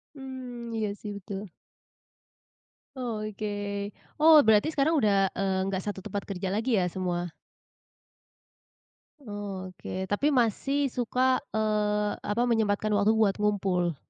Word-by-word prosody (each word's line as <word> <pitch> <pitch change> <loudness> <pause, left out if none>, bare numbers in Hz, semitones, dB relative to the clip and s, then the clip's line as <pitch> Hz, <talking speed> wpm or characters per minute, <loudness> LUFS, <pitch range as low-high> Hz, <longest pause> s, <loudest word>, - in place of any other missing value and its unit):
Mmm, 255 -3 -7
iya 215 -1 0
sih 210 - -6
betul. 200 0 -6 1.5
Oh, 230 -4 -3
oke. 205 -1 -4 0.3
Oh, 315 0 +9
berarti 220 +7 +5
sekarang 310 +1 +2
udah, 205 -8 +3
eee, 190 -1 0
nggak 190 -1 -2
satu 205 0 -4
tempat 200 +1 -4
kerja 190 -1 -3
lagi 225 +1 +1
ya 180 - +2
semua? 175 -1 -3 1.9
Oh, 205 -5 -6
oke 185 +1 -6
tapi 205 +8 +1
masih 270 +4 +1
suka, 255 +2 +1 0.2
eee, 210 -1 +1
apa, 210 +3 -1
menyempatkan 215 -2 +1
waktu 210 +2 +4
buat 215 -3 +2
ngumpul? 190 -5 +1
210 Hz, 125 wpm, -28 LUFS, 195-235 Hz, 1.9 s, Oh